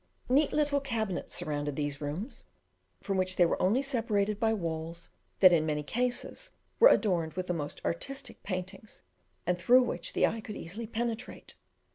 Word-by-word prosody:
Neat 280 +3 +4
little 290 -1 +2
cabinets 220 -8 -3
surrounded 145 -1 -2
these 145 0 -3
rooms, 160 - -5 0.6
from 195 -1 -1
which 185 0 0
they 175 - +5
were - - 0
only 220 +9 +3
separated 215 -6 0
by 225 -2 +2
walls 165 -4 -4 0.3
that 185 -2 +9
in 160 -2 +4
many 150 -1 -1
cases 245 - -2 0.3
were - - +10
adorned 170 -7 +2
with 185 +1 -3
the 180 - -1
most 150 -3 -4
artistic 275 +11 -3
paintings, 190 +2 -6 0.4
and 180 0 0
through 250 +8 +6
which 175 -8 -3
the - - +4
eye 225 - -1
could 215 -1 -7
easily 215 +7 -6
penetrate. 235 +1 -4
195 Hz, 165 wpm, -30 LUFS, 170-235 Hz, 0.6 s, were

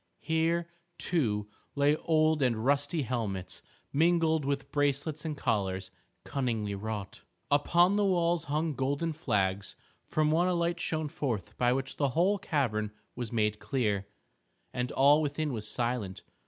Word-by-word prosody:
Here, 165 +1 +1 0.3
too, 110 -15 0 0.3
lay 145 +1 +4
old 155 -1 +2
and 115 -3 +1
rusty 145 +3 +2
helmets, 110 -7 -3 0.3
mingled 160 -1 +3
with 140 -1 -2
bracelets 145 +2 0
and 155 -2 -3
collars 95 -7 -1 0.3
cunningly 115 -7 -2
wrought. 105 -1 -5 0.3
Upon 175 +7 +4
the 205 - +3
walls 170 -3 +2
hung 155 +2 0
golden 145 +5 -1
flags. 100 -9 -1 0.3
From 155 0 +2
one 170 +3 +3
a 180 - +1
light 170 0 0
shone 155 -2 -1
forth 120 - -3
by 125 0 +2
which 135 +1 -2
the 140 -2 +2
whole 195 +4 +3
cavern 110 -11 0 0.2
was 120 -3 -4
made 105 -2 +1
clear. 105 -3 -1 0.7
And 125 0 -2
all 145 +3 +5
within 150 -1 -1
was 110 -2 -3
silent. 120 -5 -2
140 Hz, 140 wpm, -30 LUFS, 110-160 Hz, 0.7 s, all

